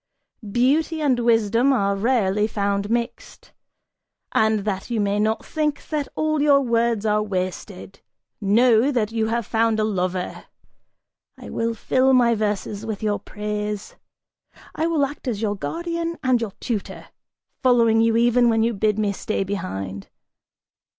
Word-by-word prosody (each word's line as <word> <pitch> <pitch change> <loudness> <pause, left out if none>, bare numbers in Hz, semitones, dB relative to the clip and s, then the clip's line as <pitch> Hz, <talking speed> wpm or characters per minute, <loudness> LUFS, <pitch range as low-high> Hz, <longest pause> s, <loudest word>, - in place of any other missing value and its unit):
Beauty 290 +8 +2
and 275 -5 +2
wisdom 230 +2 +3
are 200 -6 +1
rarely 210 -2 +1
found 200 -1 -1
mixed! 235 +1 -4 0.8
And 220 -1 +2
that 195 0 -3
you 235 -2 -1
may 205 0 0
not 220 +1 0
think 300 -2 -2
that 300 -3 -2
all 310 -1 0
your 285 -1 +5
words 235 -3 0
are 210 0 +2
wasted, 185 -1 -5 0.4
know 230 +4 +4
that 225 -5 0
you 225 -1 0
have 230 0 -1
found 225 0 +1
a - - +2
lover! 185 -3 -2 0.9
I - - -10
will 230 0 -1
fill 260 +4 +2
my 240 -2 +4
verses 210 -1 -2
with 220 -2 -5
your 210 -1 0
praise! 210 -1 -5 0.8
I 320 - -1
will 315 -4 +2
act 285 0 -9
as 225 -5 -1
your 205 -1 0
guardian 335 - -3
and 255 -2 +2
your 215 -4 -4
tutor, 220 -5 -5 0.5
following 230 -3 +4
you 230 0 +3
even 240 +1 +4
when 225 -1 +2
you 230 +1 +1
bid 210 0 0
me 210 -2 +1
stay 215 0 -2
behind! 95 - -5
225 Hz, 150 wpm, -22 LUFS, 205-245 Hz, 0.9 s, your